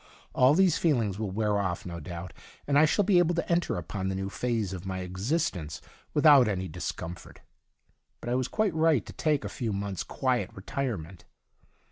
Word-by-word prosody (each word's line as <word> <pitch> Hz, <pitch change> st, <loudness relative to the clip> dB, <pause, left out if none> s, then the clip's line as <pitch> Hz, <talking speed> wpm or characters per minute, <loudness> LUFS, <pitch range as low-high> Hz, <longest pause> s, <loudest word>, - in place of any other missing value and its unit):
All 130 Hz, +3 st, +5 dB
these 185 Hz, -2 st, +4 dB
feelings 115 Hz, -, +1 dB
will 110 Hz, -3 st, -2 dB
wear 105 Hz, +1 st, 0 dB
off, 95 Hz, -3 st, -2 dB
no 85 Hz, -1 st, -6 dB
doubt, 85 Hz, +2 st, -7 dB, 0.3 s
and 140 Hz, 0 st, +3 dB
I 155 Hz, -, +7 dB
shall 200 Hz, +6 st, +2 dB
be 190 Hz, -3 st, +5 dB
able 175 Hz, 0 st, +2 dB
to 170 Hz, -, -1 dB
enter 170 Hz, -, +1 dB
upon 95 Hz, +3 st, -4 dB
the 95 Hz, -, -1 dB
new 95 Hz, +1 st, -3 dB
phase 115 Hz, -6 st, -1 dB
of 90 Hz, -2 st, -6 dB
my 95 Hz, -1 st, -4 dB
existence 95 Hz, -, -2 dB, 0.4 s
without 145 Hz, -5 st, +7 dB
any 95 Hz, -3 st, -1 dB
dis 90 Hz, +1 st, -4 dB
comfort. 85 Hz, +2 st, -9 dB, 0.8 s
But -, -, -6 dB
I -, -, +2 dB
was 130 Hz, 0 st, 0 dB
quite 215 Hz, -5 st, 0 dB
right 160 Hz, -7 st, +3 dB
to -, -, -10 dB
take 150 Hz, -3 st, 0 dB
a -, -, -1 dB
few 120 Hz, -5 st, -3 dB
months' 100 Hz, -2 st, -3 dB
quiet 125 Hz, -7 st, -1 dB
retire 120 Hz, +4 st, -3 dB
ment. 85 Hz, +2 st, -11 dB
110 Hz, 195 wpm, -28 LUFS, 95-150 Hz, 0.8 s, I